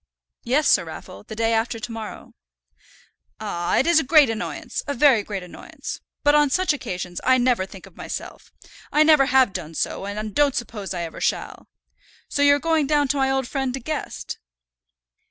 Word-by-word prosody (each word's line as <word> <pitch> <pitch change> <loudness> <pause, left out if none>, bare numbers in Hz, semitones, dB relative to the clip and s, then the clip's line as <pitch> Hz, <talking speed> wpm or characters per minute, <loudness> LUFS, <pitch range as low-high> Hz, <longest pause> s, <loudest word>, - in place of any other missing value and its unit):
"Yes, 270 +5 +2
Sir - - +5
Raffle, 165 +3 -9
the 220 - -8
day 225 +1 +1
after 230 +1 0
to 230 +1 -6
morrow." 225 -2 -8 1.1
"Ah! 175 0 -1
it's 335 +3 +4
a - - 0
great 285 -3 +5
annoyance, 225 - -4
a 285 - -2
very 260 -4 +5
great 200 -2 -5
annoyance. 180 - -8 0.2
But 290 - +5
on 295 -1 +4
such 370 +3 +2
occasions 180 -10 -5
I 260 0 +4
never 245 -6 +1
think 190 -1 -12
of - - -17
myself. - - -7 0.4
I 300 - +5
never 305 -3 +5
have 260 -5 +4
done 165 -3 -6
so, 195 - -2
and 210 +1 -5
don't 290 +1 +3
suppose 210 -5 -4
I 175 - -3
ever 165 - -7
shall. - - -2 0.6
So 285 - -1
you're 285 0 +6
going 315 -1 +1
down 290 -2 +2
to 290 - +1
my 265 -1 +2
old 265 -2 0
friend 265 -2 -2
De - - -5
Guest?" 305 +5 -5
255 Hz, 185 wpm, -23 LUFS, 210-285 Hz, 1.1 s, you're